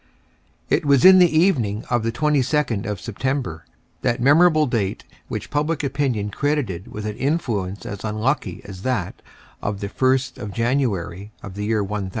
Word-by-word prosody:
It -, -, +1 dB
was 140 Hz, -1 st, +4 dB
in 185 Hz, 0 st, +9 dB
the 180 Hz, -1 st, +6 dB
evening 140 Hz, -, +2 dB
of 120 Hz, -2 st, +2 dB
the 115 Hz, +1 st, -1 dB
22d 140 Hz, -5 st, +1 dB
of 105 Hz, -3 st, -3 dB
September, 115 Hz, -, -3 dB, 0.4 s
that 120 Hz, -, 0 dB
memorable 155 Hz, +4 st, +5 dB
date 115 Hz, -7 st, -2 dB, 0.2 s
which -, -, -5 dB
public 150 Hz, +1 st, 0 dB
opinion 130 Hz, -7 st, -1 dB
credited 140 Hz, -, -1 dB
with 105 Hz, 0 st, -7 dB
an 105 Hz, 0 st, -4 dB
influence 115 Hz, -, -2 dB
as 100 Hz, -1 st, -6 dB
unlucky 110 Hz, -, -1 dB
as 95 Hz, -2 st, -9 dB
that 115 Hz, -7 st, -2 dB, 0.4 s
of 100 Hz, -1 st, -3 dB
the 100 Hz, -1 st, -4 dB
1st 130 Hz, +3 st, +1 dB
of 105 Hz, -4 st, -6 dB
January 105 Hz, -7 st, -1 dB
of 100 Hz, -, -7 dB
the 105 Hz, +2 st, -4 dB
year 110 Hz, -1 st, +1 dB
1000. 100 Hz, -1 st, -3 dB
120 Hz, 160 wpm, -22 LUFS, 100-140 Hz, 0.4 s, in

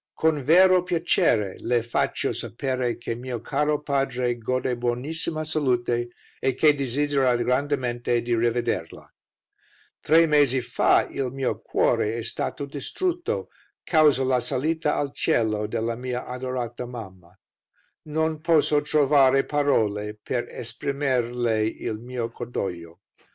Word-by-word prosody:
"Con 160 Hz, -2 st, +2 dB
vero 180 Hz, +6 st, +6 dB
piacere 170 Hz, -, +1 dB
Le 120 Hz, -1 st, 0 dB
faccio 120 Hz, -, -1 dB
sapere 130 Hz, 0 st, -2 dB
che 120 Hz, -, -4 dB
mio 120 Hz, 0 st, -5 dB
caro 150 Hz, +5 st, -1 dB
padre 135 Hz, -4 st, 0 dB
gode 130 Hz, +2 st, -1 dB
buonissima 145 Hz, +7 st, -2 dB
salute 125 Hz, -6 st, 0 dB, 0.3 s
e 130 Hz, -, 0 dB
che 150 Hz, +2 st, +5 dB
desidera 140 Hz, -1 st, +1 dB
grandemente 125 Hz, -1 st, 0 dB
di 120 Hz, 0 st, 0 dB
rivederla. 120 Hz, +1 st, -1 dB, 0.9 s
"Tre 165 Hz, +2 st, +5 dB
mesi 145 Hz, -4 st, +3 dB
fa 120 Hz, -, +2 dB
il 130 Hz, -3 st, -3 dB
mio 135 Hz, -1 st, -2 dB
cuore 110 Hz, +2 st, +1 dB
e 115 Hz, -, -4 dB
stato 140 Hz, +5 st, -3 dB
distrutto, 350 Hz, -, -3 dB, 0.3 s
causa 150 Hz, -5 st, +4 dB
la 130 Hz, -1 st, +2 dB
salita 150 Hz, +5 st, -1 dB
al 140 Hz, -1 st, -2 dB
cielo 110 Hz, -2 st, 0 dB
della 115 Hz, +1 st, -2 dB
mia 125 Hz, +1 st, -4 dB
adorata 125 Hz, -1 st, -4 dB
mamma. 95 Hz, -7 st, -10 dB, 0.7 s
Non 160 Hz, 0 st, -1 dB
posso 155 Hz, -2 st, +3 dB
trovare 140 Hz, -2 st, +4 dB
parole 105 Hz, -8 st, 0 dB
per 120 Hz, +3 st, -3 dB
esprimerle 120 Hz, -2 st, -1 dB
il 110 Hz, 0 st, -3 dB
mio 120 Hz, -1 st, -5 dB
cordoglio. 90 Hz, -8 st, -6 dB
125 Hz, 120 wpm, -25 LUFS, 120-145 Hz, 0.9 s, vero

